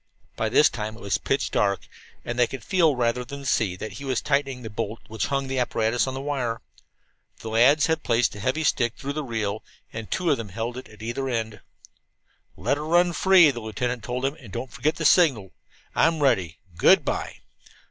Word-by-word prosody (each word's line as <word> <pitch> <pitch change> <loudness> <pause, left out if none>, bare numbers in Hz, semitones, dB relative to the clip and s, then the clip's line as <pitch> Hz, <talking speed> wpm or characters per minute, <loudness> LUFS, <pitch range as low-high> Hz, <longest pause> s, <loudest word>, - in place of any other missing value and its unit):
By - - -1
this - - +6
time 110 +1 -5
it - - -14
was 100 -2 -1
pitch - - -1
dark, 100 -1 0 0.4
and 120 0 -4
they 120 - +5
could 130 -3 -8
feel, 165 - +3
rather 125 0 0
than 140 +3 -9
see, 110 -7 +1
that 110 +4 -6
he 140 - -9
was 130 -3 0
tightening 135 -3 -1
the 110 - -6
bolt 110 +1 -4
which 110 0 -2
hung 140 -1 -1
the 130 0 -2
apparatus 115 0 +1
on 130 - -3
the - - -4
wire. 130 -5 -2 0.8
The 115 - -6
lads 130 +7 +5
had 160 0 0
placed 115 -4 +1
a 100 - -9
heavy 130 +9 -1
stick 120 -5 +1
through 140 +1 -4
the 155 +1 -3
reel, 110 -4 -3 0.3
and 110 -1 -6
two 180 -4 0
of 140 - +2
them 115 -3 -6
held 115 +5 -4 0.2
either 120 +4 -3
end 115 -3 -2
of - - -14
it. - - -30 0.9
"Let 120 - 0
it - - -4
run 175 +3 +3
free," 185 -4 +6
the 120 - -6
lieutenant 115 +2 -3
told 125 +3 -3
them. 135 +2 0
"And 120 -9 -13
don't 120 +4 -6
forget 135 +7 0
the 160 - -4
signal. 135 - +4 0.4
I'm 165 -1 +3
ready. 95 - +1 0.2
Good - - +5
by!" - - -3
125 Hz, 210 wpm, -25 LUFS, 110-140 Hz, 0.9 s, this